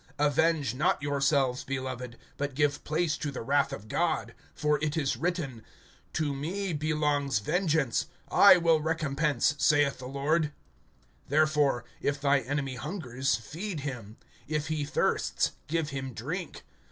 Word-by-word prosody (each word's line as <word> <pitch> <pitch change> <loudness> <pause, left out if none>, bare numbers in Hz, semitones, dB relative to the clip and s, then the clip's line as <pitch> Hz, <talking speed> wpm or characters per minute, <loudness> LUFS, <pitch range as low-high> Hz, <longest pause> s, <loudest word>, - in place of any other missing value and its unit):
(19)Avenge 150 -2 +2
not 175 +9 +1
yourselves, 140 -3 +1
beloved, 130 -2 -4 0.2
but 140 -1 -3
give 145 0 +1
place 155 0 0
to 150 - -2
the 130 - -5
wrath 140 +2 +2
[of 110 -6 -7
God]. 165 +7 0 0.2
For 150 -1 +1
it 155 +1 0
is 140 -4 +1
written: 155 -9 -3 0.5
To 150 -3 0
me 175 +7 -3
belongs 150 -3 +1
vengeance; 155 - +1 0.2
I 200 -2 +8
will 165 -2 +3
recompense, 150 -3 +1
saith 145 -3 +3
the 125 - -7
Lord. 150 +3 0 0.8
(20)Therefore, 150 -4 +3 0.2
If 140 0 0
thy 140 0 +3
enemy 135 0 -3
hungers, 135 - -1
feed 160 - -5
him; 120 -6 -6 0.3
If 155 0 -2
he 155 -2 -1
thirsts, 145 - +1 0.2
give 155 -1 -1
him 135 -3 -5
drink. 160 - -5
145 Hz, 140 wpm, -29 LUFS, 135-155 Hz, 0.8 s, I